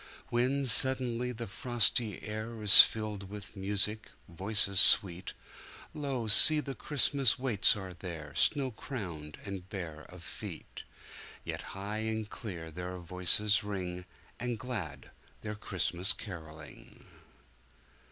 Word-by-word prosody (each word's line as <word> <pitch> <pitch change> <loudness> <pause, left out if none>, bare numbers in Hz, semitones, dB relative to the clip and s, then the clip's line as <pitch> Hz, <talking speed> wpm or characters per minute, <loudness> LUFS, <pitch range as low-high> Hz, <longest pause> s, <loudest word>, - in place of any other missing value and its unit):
When 130 +4 +1
suddenly 125 0 +1
the 120 -1 -6
frosty 115 0 +2
air 110 +2 -6
Is 105 -1 +11
filled 105 -3 -1
with 105 +1 -10
music, 105 +2 -1 0.2
voices 100 +2 0
sweet, 90 -3 +5 0.6
Lo! 140 -6 -3
see 150 +8 +7
the 140 -2 -5
Christmas 140 -3 +2
waits 125 -6 +3
are 95 -3 -7
there 85 -5 -8
Snow 135 - +1
crowned 85 - -7
and 95 -2 -7
bare 80 -6 -7
of - - -13
feet, - - -9 0.6
Yet - - -5 0.2
high 105 +2 -4
and 110 -1 -3
clear 90 -8 -7
their 90 +2 -6
voices 90 +5 +1
ring, 90 -3 -5 0.3
And 120 -1 -3
glad 95 - -7 0.3
their 105 - -5
Christmas 95 -2 0
carolling. 80 -6 -11
105 Hz, 120 wpm, -31 LUFS, 90-120 Hz, 0.6 s, Is